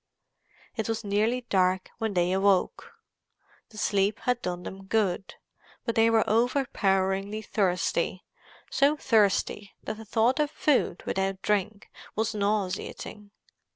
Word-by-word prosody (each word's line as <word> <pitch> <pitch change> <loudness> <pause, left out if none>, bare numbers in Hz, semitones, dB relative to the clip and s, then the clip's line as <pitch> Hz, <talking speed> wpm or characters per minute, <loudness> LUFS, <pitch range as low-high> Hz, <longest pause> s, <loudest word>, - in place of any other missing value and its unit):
It 220 -1 -3
was 225 0 -2
nearly 215 +5 +1
dark 185 -5 +1
when 220 -3 -2
they 175 0 +2
awoke. 195 - +1 0.8
The 215 - -15
sleep 205 0 +1
had 250 -1 0
done 180 0 -4
them 195 +1 -8
good, 195 -3 0 0.5
but 230 - 0
they 225 0 +4
were 225 -1 +3
overpoweringly 210 -4 +1
thirsty—so 195 - -1
thirsty 210 -4 +1
that 215 - -4
the 220 - -10
thought 230 +6 +2
of 300 -1 +2
food 300 - +1
without 195 0 -2
drink 210 0 -1 0.2
was 220 +1 0
nauseating. 205 0 -3
210 Hz, 120 wpm, -27 LUFS, 195-225 Hz, 0.8 s, they